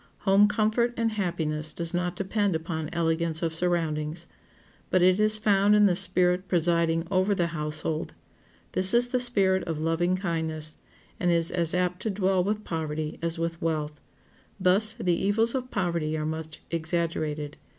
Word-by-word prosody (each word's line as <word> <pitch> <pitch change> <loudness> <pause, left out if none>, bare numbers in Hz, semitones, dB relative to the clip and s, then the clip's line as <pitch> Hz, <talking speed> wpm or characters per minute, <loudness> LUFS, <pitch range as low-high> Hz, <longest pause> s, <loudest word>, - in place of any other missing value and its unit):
Home 200 +1 +5
comfort 220 +3 +1
and 230 -1 0
happiness 160 -6 -2
does 170 +2 -4
not 180 0 -1
depend 195 0 0
upon 160 -1 -4
elegance 165 -1 0
of 165 -1 -1
surroundings. 165 -1 -1 0.6
But 185 -1 +3
it 185 +2 +4
is 215 0 +4
found 205 -1 +3
in 210 0 +5
the 185 -3 +3
spirit 180 +1 +1
presiding 170 -1 +1
over 190 +2 +2
the 175 - +1
household; 155 +1 -3 0.6
this 185 +3 +3
is 240 0 +3
the 250 - 0
spirit 195 -6 +1
of 165 -2 -3
loving 165 +3 +1
kindness, 160 -4 -2 0.5
and 180 - +1
is 170 -1 +2
as 170 -1 +2
apt 180 0 -1
to 220 - -2
dwell 190 -2 +1
with 210 +2 -2
poverty 155 -3 -4
as 170 0 -2
with 165 0 -3
wealth. 150 -2 -2 0.6
Thus 195 +4 +4
the 205 -7 0
evils 210 +6 +3
of 255 -1 -3
poverty 170 -6 -1
are 155 - -3
much 160 0 -5
exaggerated. 160 -3 -2
175 Hz, 160 wpm, -26 LUFS, 160-195 Hz, 0.6 s, Home